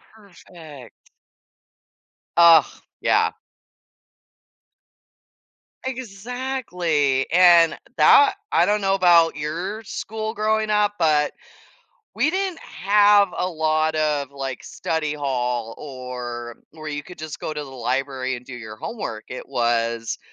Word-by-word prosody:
Perfect. 170 - -15 1.3
Ugh, 170 -2 +8 0.4
yeah. - - +2 2.5
Exactly, 205 - -2
and 170 -1 +6 0.2
that, 410 -2 +6 0.2
I 170 - +4
don't 210 +2 +1
know 195 -1 +1
about 175 -3 +4
your 175 +9 -4
school 220 +2 -5
growing 215 0 0
up, 210 -1 +2
but 150 -3 +2 0.8
we 300 - +1
didn't 375 -1 -2
have 205 0 +3
a 180 - -1
lot 155 -1 0
of, 150 -3 0
like, 135 -2 -6
study 155 -2 -3
hall 125 -5 -2
or 125 -4 -7
where 155 -1 -8
you 145 0 -4
could 180 +4 -13
just 155 -1 -7
go 155 - -5
to 150 - -4
the - - -10
library, 130 +1 -2
and 125 0 -11
do 135 - -10
your 110 -3 -9
homework, 110 - -6
it 125 - -8
was, 115 -2 -1
155 Hz, 115 wpm, -22 LUFS, 135-200 Hz, 2.5 s, Ugh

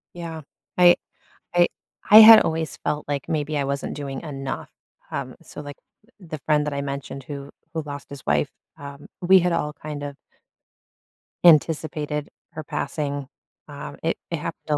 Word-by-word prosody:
Yeah, 165 -2 -6 0.4
I 175 -1 +7 0.6
I 175 0 +5 0.4
I 210 - +10
had 220 0 +11
always 160 0 -2
felt, 150 0 -3
like, 145 -2 -3
maybe 150 -1 -1
I 140 - 0
wasn't 140 0 -3
doing 140 -2 -5
enough, 135 -4 -5 0.4
um, - - -4
so, - - -10
like, 145 -1 -9 0.4
th 180 -5 -15
the 155 - -4
friend 150 -1 +2
that 150 - -2
I 140 - -2
mentioned 140 -1 -5
who 140 0 -7 0.2
who 160 - -2
lost 145 -1 -8
his 140 -2 -10
wife, 75 0 +1 0.3
um, 140 0 -10
we 190 +1 +6
had 180 0 +1
all 150 -2 -1
kind 150 -1 -7
of 145 -1 -6 1.3
anticipated 155 -2 +3 0.2
her 155 - -7
passing, 140 -1 -3 0.4
um, - - -8
it - - 0
it - - -2
happened - - -7
a 150 - +2
150 Hz, 165 wpm, -23 LUFS, 140-160 Hz, 1.3 s, had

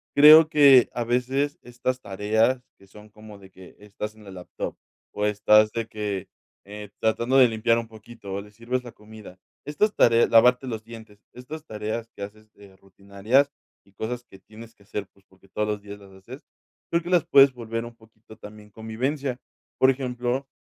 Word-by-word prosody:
creo 155 +2 +9
que 140 -5 +6
a 120 - -2
veces 130 +4 -1
estas 125 +1 -4
tareas 110 +5 0 0.2
que 100 - -21
son 105 +2 -16
como 105 -1 -14
de 95 -1 -16
que 95 -1 -16
estás 105 +1 -8
en 110 - -17
la 100 - -12
laptop, 90 -1 -7 0.4
o 105 - -2
estás 105 +1 +4
de 115 -1 -3
que, 105 -3 -5 0.3
eh, 105 0 -10
tratando 115 +4 +1
de 125 -3 +6
limpiar 115 +1 +1
un 115 - -7
poquito, 110 -2 -11
o 100 - -4
le 105 +1 -15
sirves 120 +4 -4
la 120 - -10
comida. 105 -3 -14 0.3
Estas 205 +9 0
tareas, 115 0 +4
lavarte 125 +3 +4
los 110 -3 -5
dientes, 110 -3 -13
estas 150 +5 -10
tareas 110 0 -5
que - - -12
haces, 110 +1 -11
eh, 100 -2 -18
rutinarias, 100 +8 -1 0.3
y 100 - -28
cosas 120 +5 -5
que 95 - -17
tienes 110 +3 -15
que 100 - -24
hacer, 100 -1 -6
pues, 100 -1 -30
porque 95 0 -25
todos 105 +2 -2
los 105 -1 -3
días 100 0 -10
las 100 -1 -17
haces, 115 +10 -13 0.5
creo 170 - +1
que 175 - -8
las 175 -4 +2
puedes 135 0 +6
volver 115 -1 -5
un 120 0 -11
poquito 110 -1 -19
también 105 0 -13
convivencia. 125 +5 -4 0.4
Por 130 - +5
ejemplo, 125 0 -2
110 Hz, 190 wpm, -24 LUFS, 105-125 Hz, 0.5 s, creo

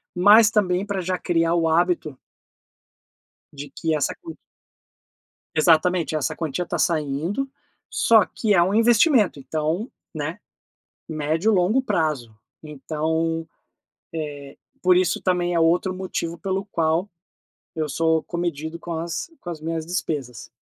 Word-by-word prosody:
mas 205 +4 +7
também 190 -3 +1
pra 200 -2 -2
já 185 +1 -1
criar 165 -2 +1
o 165 -1 +2
hábito 160 -3 +1 1.4
de 145 0 -8
que 160 -1 -1
essa 150 - 0
quan 330 -1 -8 1.2
Exatamente, 165 0 +3
essa 150 - -1
quantia 160 +2 -3
tá - - -3
saindo, 165 - -1 0.4
só 220 -4 +4
que 215 -2 -1
é 185 - +5
um 190 +4 +1
investimento, 230 - +4
então, 155 - -2 0.2
né, 160 +5 -4 0.7
médio-longo 175 - +1
prazo. 155 - -1 0.3
Então, 160 +2 -2
eh, - - -47 1.2
por 180 0 +5
isso 180 -3 +1
também 175 -1 +1
é 170 - +2
outro 175 +3 +2
motivo 180 -3 -4
pelo 190 +3 -2
qual 165 +4 +1 0.7
eu 155 -1 -2
sou 160 +2 +1
comedido 170 -2 -4
com 170 0 -7
as 165 - -4
com - - -10
as 165 - -6
minhas 160 0 -3
despesas. 145 -8 -4
170 Hz, 130 wpm, -23 LUFS, 155-185 Hz, 1.4 s, mas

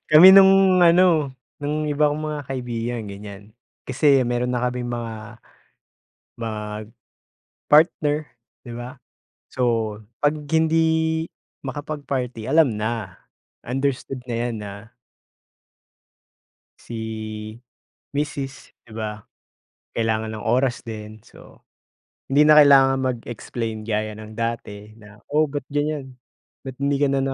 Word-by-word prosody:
kami 155 +4 +10
nung 195 -1 +7
ano, 170 -5 +4 0.3
nung 150 +1 -2
iba 150 0 +2
kong 150 +1 -3
mga 150 -1 -3
kaibigan 120 -2 -3
ganiyan, 100 0 -9 0.4
kasi 135 0 +3
meron 120 +1 -1
na 125 - -1
kaming 125 0 -2
mga 115 -3 -6 2.1
mag-partner, 150 -1 +2 0.5
'di 120 - -8
ba? 120 +3 -7 0.5
So, 130 - -5 0.6
'pag 145 +1 +3 0.2
hindi 160 0 +3 0.9
makapag-party 135 -5 -4
alam 140 -5 +3
na, 110 -3 -3 0.5
understood 135 0 -2
na 120 - -1
'yan 120 0 -2
na 100 -1 -6 2.1
si 110 -1 -6 0.6
misis, 145 -1 -4
'di 115 - -18
ba, 105 -1 -4 0.7
kailangan 110 -1 -1
ng 105 - -8
oras 125 0 +1
din, 110 -1 -9
so - - -17 0.7
hindi 150 +2 +5
na 155 - +8
kailangan 135 -2 +6
mag-explain 115 -1 -6
gaya 110 -1 -2
ng 110 0 -10
dati 110 -2 -5
na, 105 -1 -16
"Oh, 150 +2 +3
ba't 145 -2 -4
ganiyan, 145 -3 -3 0.5
ba't 130 -1 -7
hindi 140 0 +1
ka 140 0 +2
na 135 - +1
125 Hz, 110 wpm, -22 LUFS, 110-145 Hz, 2.1 s, kami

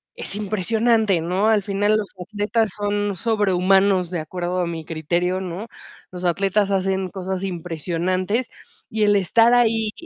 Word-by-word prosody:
es - - -6
impresionante, 215 0 +1
¿no? 185 +6 +1
Al 215 -2 +3
final, 205 +2 +1
los 210 -2 -3 0.2
atletas 210 +1 0
son 205 -1 -1
sobrehumanos, 190 -3 +2
de 175 - -2
acuerdo 180 +2 -3
a - - 0
mi 165 -2 -5
criterio, 175 +4 -1
¿no? 185 +5 -5 0.4
Los 180 0 -8
atletas 195 +3 +1
hacen 190 -1 0
cosas 190 0 -4
impresionantes, 180 - -2 0.4
y 220 0 0
el 205 0 +4
estar 225 +5 +4
ahí, 225 -3 +3
195 Hz, 145 wpm, -22 LUFS, 180-210 Hz, 0.4 s, el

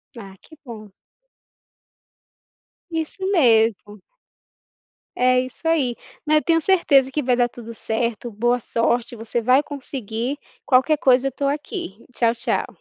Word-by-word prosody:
Ah, 195 -4 -11
que 315 - -17
bom. 215 -3 -10 2.0
Isso 325 +4 -4
mesmo. 225 - +2 1.2
É 255 0 +3
isso 255 +6 -7
ai, 275 -8 +1 0.3
mas 305 0 +4
eu - - +2
tenho 330 -1 +2
certeza 280 -8 +3
que 295 0 -2
vai 250 -1 +2
dar 240 0 +1
tudo 230 -1 -10
certo, 230 +1 -3
boa 240 +4 0
sorte, 235 +1 -1
você 230 +1 -3
vai 255 +5 +3
conseguir, 260 -2 -5 0.3
qualquer 265 +4 +3
coisa 260 -1 +3
eu - - -2
tô 280 +3 -4
aqui, 275 - -4
tchau, 230 0 +1
tchau. 230 - -2
250 Hz, 135 wpm, -21 LUFS, 230-285 Hz, 2.0 s, mas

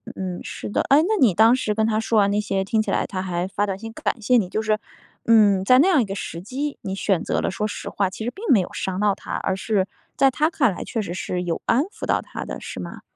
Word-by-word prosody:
嗯， 185 -2 -4
是 - - -6
的， - - +1
哎， 280 +2 +6
那 430 +6 +1
你 220 -8 +5
当 225 +3 +6
时 220 -5 -1
跟 220 0 +2
她 220 -1 +1
说 225 0 0
完 200 -1 +4
那 205 +1 +1
些， 195 -2 -1
听 220 +3 +1
起 - - -4
来 - - +1
她 185 -2 -4
还 180 -1 -2
发 200 +1 -1
短 195 -2 -3
信 225 +2 -8
感 235 - -2
谢 250 +3 +3
你， 185 -5 0
就 215 - -1
是， 215 -1 0 0.5
嗯， 205 -4 +5
在 255 +6 +6
那 320 - +5
样 330 -8 +4
一 - - 0
个 195 -1 -5
时 170 -3 -6
机， 275 +9 -4
你 190 0 -4
选 195 -2 0
择 - - -1
了 - - -1
说 210 +3 -2
实 210 - -6
话， 195 -2 0
其 220 +3 -7
实 240 - -2
并 395 - -11
没 225 - +6
有 180 - -4
伤 190 0 -3
到 210 -1 +3
她， - - -8
而 190 - -1
是 195 -1 0 0.3
在 270 -1 +5
她 305 +5 +1
看 265 - +2
来 - - -6
确 225 - -4
实 175 -4 -5
是 180 0 -3
有 170 -2 -2
安 250 +5 +3
抚 395 - -8
到 - - +2
她 - - -7
的， - - -6
是 - - -7
吗？ - - -7
210 Hz, 305 characters per minute, -23 LUFS, 190-235 Hz, 0.5 s, 哎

